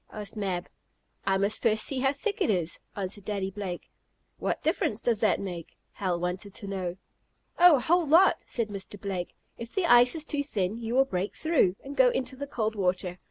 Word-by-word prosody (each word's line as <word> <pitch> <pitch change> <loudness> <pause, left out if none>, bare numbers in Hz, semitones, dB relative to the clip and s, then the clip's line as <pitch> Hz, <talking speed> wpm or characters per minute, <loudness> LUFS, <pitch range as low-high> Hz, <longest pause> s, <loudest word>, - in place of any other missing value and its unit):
asked 210 0 -6
Mab, 190 -4 -2 0.6
"I 195 0 +3
must 200 +2 0
first 220 -1 +4
see 270 - 0
how 270 +1 +3
thick 405 +9 -4
it - - +2
is," 175 -5 0 0.2
answered 200 0 -4
Daddy 195 -1 -3
Blake. 190 -3 -6 0.5
"What - - -2
difference 270 - 0
does 230 -3 0
that - - +2
make?" 175 -4 -7
Hal 180 -3 -2
wanted 180 +3 -4
to 205 - -7
know. 185 -2 -4 0.6
"Oh, 350 -2 +8
a - - +1
whole 345 +4 +2
lot," 340 +6 +5
said 230 -3 -1
Mr. 200 0 -8
Blake. 190 -3 -4 0.2
"If 235 0 -8
the 385 -3 +1
ice 245 -2 +6
is 315 - -1
too 290 -2 -1
thin 215 -5 -2
you 230 +1 -3
will 270 +1 +5
break 190 -5 -3
through, 315 - +2
and 275 +1 -8
go - - +6
into 260 - -3
the 280 +2 -6
cold 220 -5 -2
water. 180 -2 -1
210 Hz, 205 wpm, -28 LUFS, 190-270 Hz, 0.6 s, Oh